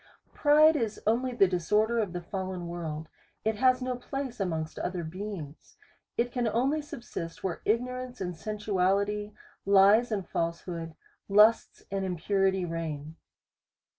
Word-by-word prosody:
Pride 305 Hz, +2 st, +6 dB
is 225 Hz, -7 st, -1 dB
only 240 Hz, +4 st, +2 dB
the 215 Hz, -6 st, +4 dB
disorder 210 Hz, +6 st, +1 dB
of 205 Hz, -5 st, -1 dB
the 175 Hz, 0 st, -5 dB
fallen 185 Hz, -1 st, -4 dB
world, 160 Hz, -2 st, -5 dB, 0.4 s
it 220 Hz, -1 st, +1 dB
has 255 Hz, +1 st, +3 dB
no 255 Hz, 0 st, -1 dB
place 260 Hz, -1 st, -5 dB
amongst 160 Hz, -5 st, -2 dB
other 180 Hz, -1 st, -3 dB
beings; 170 Hz, -3 st, -7 dB, 0.4 s
it 240 Hz, +1 st, +1 dB
can 245 Hz, -2 st, 0 dB
only 265 Hz, +7 st, +1 dB
subsist 170 Hz, -, -7 dB
where 185 Hz, -3 st, -3 dB
ignorance 250 Hz, +2 st, -1 dB
and 180 Hz, -2 st, -3 dB
sensuality, 205 Hz, +2 st, 0 dB, 0.3 s
lies 200 Hz, +4 st, +5 dB
and 195 Hz, -4 st, -2 dB
falsehood, 165 Hz, -1 st, -3 dB, 0.3 s
lusts 210 Hz, +3 st, +4 dB
and 195 Hz, -1 st, -1 dB
impurity 190 Hz, +1 st, +1 dB
reign. 160 Hz, -2 st, -5 dB
200 Hz, 135 wpm, -29 LUFS, 175-235 Hz, 0.4 s, Pride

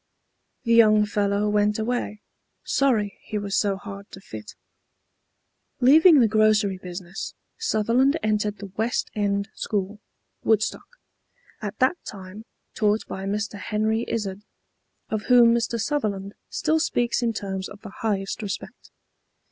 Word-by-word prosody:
The 235 Hz, -, +2 dB
young 215 Hz, -2 st, +6 dB
fellow 205 Hz, 0 st, 0 dB
went 210 Hz, 0 st, +2 dB
away, 220 Hz, -2 st, -2 dB, 0.4 s
sorry 225 Hz, -8 st, +1 dB
he 215 Hz, -, -5 dB
was 205 Hz, 0 st, -2 dB
so 200 Hz, -3 st, +2 dB
hard 200 Hz, 0 st, -9 dB
to 190 Hz, -, -11 dB
fit. 110 Hz, -, -10 dB, 1.2 s
Leaving 305 Hz, +5 st, +7 dB
the 230 Hz, -, +5 dB
grocery 215 Hz, -3 st, +3 dB
business, 180 Hz, 0 st, -7 dB, 0.2 s
Sutherland 260 Hz, -, +2 dB
entered 210 Hz, -1 st, 0 dB
the 200 Hz, -1 st, -9 dB
West 225 Hz, +2 st, -1 dB
End 200 Hz, 0 st, -1 dB
School, 205 Hz, 0 st, -3 dB, 0.4 s
Woodstock, 220 Hz, -1 st, +1 dB, 0.7 s
at 205 Hz, -3 st, -5 dB
that 260 Hz, +7 st, +2 dB
time 195 Hz, +2 st, -9 dB, 0.3 s
taught 215 Hz, -1 st, +1 dB
by 190 Hz, 0 st, -5 dB
Mr. 205 Hz, +1 st, -3 dB
Henry 215 Hz, +3 st, 0 dB
Izard, 200 Hz, -3 st, -3 dB, 0.7 s
of 215 Hz, -1 st, -2 dB
whom 240 Hz, -2 st, +6 dB
Mr. 235 Hz, 0 st, 0 dB
Sutherland 210 Hz, -6 st, -2 dB, 0.2 s
still 315 Hz, 0 st, +1 dB
speaks 240 Hz, -6 st, 0 dB
in 235 Hz, -1 st, +1 dB
terms 190 Hz, -3 st, -4 dB
of 205 Hz, -, -12 dB
the 210 Hz, -3 st, -10 dB
highest 200 Hz, -3 st, -1 dB
respect. 205 Hz, -2 st, -6 dB
210 Hz, 130 wpm, -24 LUFS, 200-230 Hz, 1.2 s, Leaving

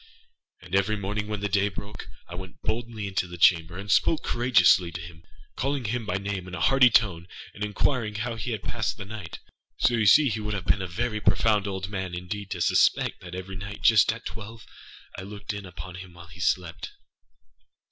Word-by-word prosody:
And 90 Hz, 0 st, -13 dB
every 100 Hz, +2 st, +2 dB
morning, 105 Hz, +1 st, -3 dB
when 105 Hz, -1 st, -3 dB
the 100 Hz, -, 0 dB
day 100 Hz, +1 st, +2 dB
broke, 100 Hz, +1 st, -8 dB, 0.2 s
I 85 Hz, -, -10 dB
went 95 Hz, 0 st, -9 dB
boldly 115 Hz, -2 st, -3 dB
into 95 Hz, -2 st, -1 dB
the 90 Hz, 0 st, -9 dB
chamber, 85 Hz, 0 st, +4 dB
and 100 Hz, +1 st, -4 dB
spoke 160 Hz, -, +3 dB
courageously 120 Hz, -7 st, +4 dB
to 90 Hz, -, -5 dB
him, 85 Hz, -1 st, -10 dB, 0.3 s
calling 135 Hz, -1 st, -1 dB
him 115 Hz, +1 st, -2 dB
by 90 Hz, -, -1 dB
name 100 Hz, -2 st, -4 dB
in 90 Hz, -, -6 dB
a -, -, -5 dB
hearty 135 Hz, -1 st, +6 dB
tone, 95 Hz, -7 st, +2 dB, 0.3 s
and 105 Hz, -, -6 dB
inquiring 105 Hz, +1 st, 0 dB
how 120 Hz, +3 st, -2 dB
he 115 Hz, +2 st, -4 dB
has 110 Hz, -4 st, -3 dB
passed 110 Hz, +1 st, -2 dB
the 100 Hz, -, -7 dB
night. 100 Hz, -5 st, -7 dB, 0.4 s
So 120 Hz, -, +3 dB
you 110 Hz, -3 st, +2 dB
see 145 Hz, +7 st, +7 dB
he 110 Hz, -1 st, -2 dB
would 105 Hz, 0 st, -3 dB
have 95 Hz, -3 st, -5 dB
been 100 Hz, -, +2 dB
a 95 Hz, -, -3 dB
very 110 Hz, +4 st, -2 dB
profound 105 Hz, +2 st, +2 dB
old 95 Hz, -1 st, -3 dB
man, 95 Hz, -3 st, -4 dB
indeed, 90 Hz, +3 st, -5 dB
to 90 Hz, -3 st, -4 dB
suspect -, -, +3 dB
that 90 Hz, 0 st, -8 dB
every 95 Hz, +1 st, -6 dB
night, 100 Hz, +2 st, -8 dB
just 110 Hz, 0 st, +6 dB
at 115 Hz, +1 st, -9 dB
twelve, 110 Hz, 0 st, -8 dB, 0.5 s
I -, -, -5 dB
looked 100 Hz, +2 st, -6 dB
in 100 Hz, -1 st, -7 dB
upon 90 Hz, +1 st, -9 dB
him 90 Hz, 0 st, -10 dB
while 85 Hz, -1 st, -13 dB
he 90 Hz, +1 st, -14 dB
slept. 85 Hz, 0 st, -1 dB
100 Hz, 210 wpm, -26 LUFS, 90-110 Hz, 0.5 s, see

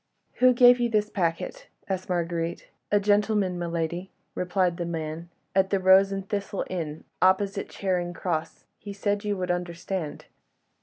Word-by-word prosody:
"Who 255 Hz, 0 st, +6 dB
gave 245 Hz, 0 st, +7 dB
you 240 Hz, -1 st, +1 dB
this 210 Hz, -2 st, +1 dB
packet?" 165 Hz, -4 st, -2 dB, 0.2 s
asked 190 Hz, -1 st, -3 dB
Marguerite. 170 Hz, -1 st, -2 dB, 0.2 s
"A 205 Hz, -, +5 dB
gentleman, 205 Hz, -2 st, +2 dB
my 175 Hz, -, -2 dB
lady," 170 Hz, +2 st, -3 dB, 0.2 s
replied 180 Hz, -1 st, 0 dB
the 175 Hz, -, -2 dB
man, 165 Hz, 0 st, -4 dB, 0.3 s
"at 190 Hz, 0 st, +3 dB
'The 195 Hz, -, +2 dB
Rose 190 Hz, +1 st, +6 dB
and 195 Hz, 0 st, -4 dB
Thistle' 200 Hz, -1 st, -3 dB
inn 160 Hz, -4 st, -4 dB, 0.2 s
opposite 195 Hz, +1 st, +2 dB
Charing 180 Hz, -3 st, -1 dB
Cross. 170 Hz, -3 st, -3 dB
He 205 Hz, -1 st, -7 dB
said 205 Hz, 0 st, -1 dB
you 205 Hz, -1 st, -1 dB
would 180 Hz, -1 st, -1 dB
understand." 175 Hz, -1 st, -4 dB
185 Hz, 155 wpm, -26 LUFS, 170-200 Hz, 0.3 s, gave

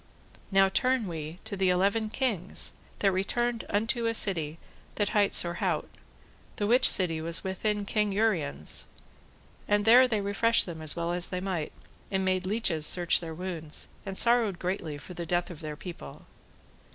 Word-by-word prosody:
Now 195 Hz, 0 st, +5 dB
turn 255 Hz, +4 st, +1 dB
we 160 Hz, -1 st, -6 dB
to 220 Hz, -2 st, -5 dB
the 190 Hz, -1 st, +2 dB
eleven 200 Hz, +4 st, +1 dB
kings 215 Hz, -8 st, -1 dB, 0.2 s
that 195 Hz, -, +2 dB
returned 230 Hz, +5 st, -1 dB
unto 225 Hz, +3 st, 0 dB
a 230 Hz, -, 0 dB
city 165 Hz, -7 st, +1 dB, 0.4 s
that 205 Hz, -1 st, 0 dB
hight 205 Hz, -3 st, +2 dB
Sorhaute, 170 Hz, 0 st, +1 dB, 0.6 s
the 205 Hz, -, -1 dB
which 245 Hz, +4 st, +4 dB
city 165 Hz, -4 st, +2 dB
was 165 Hz, +1 st, -2 dB
within 205 Hz, +2 st, -1 dB
King 210 Hz, 0 st, 0 dB
Uriens', 180 Hz, -, -1 dB, 0.8 s
and 205 Hz, 0 st, +2 dB
there 250 Hz, +3 st, +7 dB
they 220 Hz, -4 st, 0 dB
refreshed 205 Hz, +3 st, +2 dB
them 165 Hz, -3 st, -7 dB
as 155 Hz, -1 st, 0 dB
well 170 Hz, 0 st, -2 dB
as 175 Hz, 0 st, 0 dB
they 180 Hz, -, -3 dB
might, 180 Hz, -5 st, -3 dB, 0.4 s
and 190 Hz, -1 st, -1 dB
made 185 Hz, 0 st, 0 dB
leeches 190 Hz, -7 st, 0 dB
search 175 Hz, -2 st, +4 dB
their 165 Hz, -2 st, -7 dB
wounds, 165 Hz, -3 st, -5 dB
and 195 Hz, -1 st, -6 dB
sorrowed 235 Hz, -5 st, +3 dB
greatly 175 Hz, -5 st, -3 dB
for 165 Hz, +5 st, -10 dB
the 170 Hz, -1 st, -6 dB
death 175 Hz, +1 st, 0 dB
of 165 Hz, -, -9 dB
their 155 Hz, -2 st, -6 dB
people. 165 Hz, -, -10 dB
190 Hz, 165 wpm, -28 LUFS, 170-215 Hz, 0.8 s, there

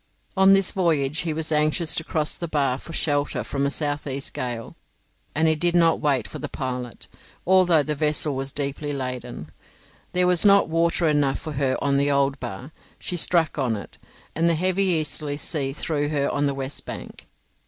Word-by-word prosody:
On 190 Hz, 0 st, +6 dB
this 195 Hz, -1 st, +3 dB
voyage 160 Hz, -5 st, 0 dB
he 170 Hz, -3 st, -1 dB
was 160 Hz, +1 st, -3 dB
anxious 155 Hz, +2 st, +2 dB
to 160 Hz, -, 0 dB
cross 155 Hz, -2 st, -1 dB
the 170 Hz, -, -5 dB
bar 140 Hz, -4 st, 0 dB
for -, -, -10 dB
shelter 145 Hz, -3 st, -1 dB
from 140 Hz, 0 st, -1 dB
a -, -, 0 dB
south 145 Hz, 0 st, -2 dB
east 135 Hz, 0 st, -4 dB
gale, 120 Hz, -2 st, -5 dB, 0.6 s
and 160 Hz, +2 st, +3 dB
he 160 Hz, -, +5 dB
did 170 Hz, +3 st, 0 dB
not 165 Hz, -1 st, +4 dB
wait 140 Hz, -4 st, 0 dB
for -, -, -8 dB
the -, -, -5 dB
pilot, 125 Hz, -3 st, -5 dB, 0.4 s
although 180 Hz, -4 st, +4 dB
the 150 Hz, -, -2 dB
vessel 150 Hz, -1 st, 0 dB
was 135 Hz, +1 st, -4 dB
deeply 145 Hz, +1 st, -3 dB
laden; 125 Hz, -2 st, -6 dB, 0.6 s
there 180 Hz, 0 st, +3 dB
was 180 Hz, -2 st, +6 dB
not 200 Hz, -1 st, +6 dB
water 165 Hz, +1 st, +1 dB
enough 145 Hz, -3 st, +2 dB
for 155 Hz, -, -7 dB
her 135 Hz, -2 st, 0 dB
on 140 Hz, -1 st, +2 dB
the 140 Hz, +1 st, +2 dB
old 140 Hz, 0 st, +1 dB
bar; 120 Hz, +4 st, -7 dB, 0.3 s
she 180 Hz, -, -4 dB
struck 165 Hz, -2 st, +1 dB
on 125 Hz, -5 st, 0 dB
it, 100 Hz, -, -10 dB, 0.4 s
and 165 Hz, +1 st, +2 dB
the 165 Hz, -, +2 dB
heavy 185 Hz, +4 st, +1 dB
easterly 150 Hz, -4 st, 0 dB
sea 145 Hz, -3 st, -1 dB
threw 145 Hz, 0 st, -2 dB
her 145 Hz, -2 st, 0 dB
on 145 Hz, 0 st, 0 dB
the 140 Hz, -, -2 dB
west 135 Hz, 0 st, -5 dB
bank. -, -, -9 dB
150 Hz, 195 wpm, -24 LUFS, 140-165 Hz, 0.6 s, On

